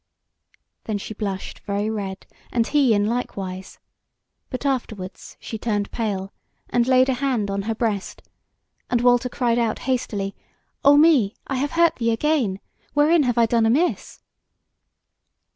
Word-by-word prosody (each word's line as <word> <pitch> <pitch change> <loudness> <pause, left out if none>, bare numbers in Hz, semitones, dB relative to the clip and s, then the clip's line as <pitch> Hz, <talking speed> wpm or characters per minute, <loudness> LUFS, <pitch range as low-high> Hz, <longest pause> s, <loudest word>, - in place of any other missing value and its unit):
Then 215 -2 -1
she 205 - -7
blushed 195 -3 -5
very 205 +1 -2
red, 200 -3 -4 0.3
and 235 -2 +2
he 270 -4 +3
in 205 0 +2
like 240 +1 -2
wise; 185 -1 -6 0.7
but 255 +2 -5
afterwards 220 -8 -4
she 220 - -6
turned 205 -3 -1
pale, 200 -4 -3 0.4
and 240 0 +2
laid 260 0 +5
a 265 - +2
hand 245 -6 -1
on 200 0 -1
her 225 - 0
breast, 215 -4 -2 0.7
and 240 -1 +1
Walter 245 +1 +3
cried 240 -1 +1
out 230 -2 0
hastily: 210 -6 -2 0.5
"O 285 +1 +7
me! 290 -10 +5
I 270 - -2
have 285 +2 -1
hurt 335 0 +3
thee 230 -1 0
again. 230 -5 +1 0.4
Wherein 305 +3 +5
have 245 -4 0
I 235 - +5
done 230 0 +2
amiss?" 300 +10 0
230 Hz, 150 wpm, -23 LUFS, 205-260 Hz, 0.7 s, O